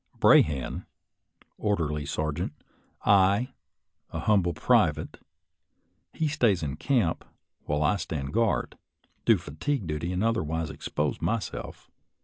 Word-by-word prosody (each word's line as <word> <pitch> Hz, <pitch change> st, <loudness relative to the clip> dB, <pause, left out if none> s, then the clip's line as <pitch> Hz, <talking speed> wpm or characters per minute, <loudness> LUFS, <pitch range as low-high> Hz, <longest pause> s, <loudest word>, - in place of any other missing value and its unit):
Brahan, 70 Hz, -4 st, +3 dB, 0.7 s
orderly 75 Hz, -8 st, -1 dB
sergeant; 75 Hz, +2 st, -2 dB, 0.5 s
I, 100 Hz, +6 st, +4 dB, 0.6 s
a 80 Hz, -, -4 dB
humble 90 Hz, -4 st, +2 dB
private; 80 Hz, -, +2 dB, 0.9 s
he 160 Hz, -, -1 dB
stays 115 Hz, -, +2 dB
in 70 Hz, -1 st, -3 dB
camp, 115 Hz, -, +1 dB, 0.4 s
while 75 Hz, +1 st, 0 dB
I 95 Hz, +7 st, +3 dB
stand 75 Hz, -6 st, -4 dB
guard, 115 Hz, 0 st, 0 dB, 0.5 s
do -, -, +6 dB
fatigue 95 Hz, -, -3 dB
duty, 80 Hz, +2 st, -3 dB
and 90 Hz, +2 st, -1 dB
otherwise 80 Hz, -8 st, 0 dB
expose 75 Hz, -1 st, -3 dB
myself. 115 Hz, -1 st, -4 dB
85 Hz, 110 wpm, -27 LUFS, 75-105 Hz, 0.9 s, do